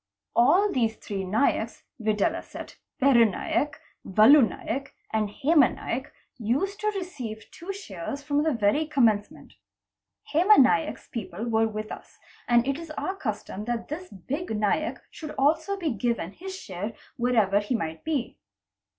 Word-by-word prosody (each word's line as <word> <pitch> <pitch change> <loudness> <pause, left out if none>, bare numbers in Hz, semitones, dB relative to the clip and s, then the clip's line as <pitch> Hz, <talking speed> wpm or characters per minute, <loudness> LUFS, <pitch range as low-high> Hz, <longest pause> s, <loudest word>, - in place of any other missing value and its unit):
All 365 - +5
these 225 -4 +1
three 195 -2 -5
Naiks, 215 +9 0 0.2
viz., 215 -1 +1 0.8
Peru 265 -4 +6
Naik, 255 +7 -1 0.2
Valu 220 +10 +7
Naik, 275 +4 -5 0.2
and 215 -1 +1
Hema 290 +5 +3
Naik, 260 +4 -4 0.3
used 280 - -1
to 425 - -1
receive 255 - -5
two 350 +4 -7
shares 280 - -6
from 290 0 +1
the 315 +1 +2
very 235 +6 +2
commence 230 -9 +3
ment. - - -16 0.8
Hema 365 +7 +6
Naick's 230 -11 +3
people 210 -2 -5
were 225 -1 +3
with 215 0 -5
us, - - -10 0.3
and 240 +1 +4
it 275 +2 0
is 335 -1 -8
our 380 - -2
custom 215 - -4
that 240 -1 -3
this 355 +5 -6
big 285 - -5
Naik 215 +10 0 0.4
also 315 +7 +2
should 395 - -4
be 325 -5 0
given 230 -5 -1
his 375 - -8
share 200 - -5 0.2
wherever 225 -5 +3
he 210 +4 -1
might 160 -7 -4
be. 295 -6 -2
240 Hz, 150 wpm, -26 LUFS, 215-305 Hz, 0.8 s, Valu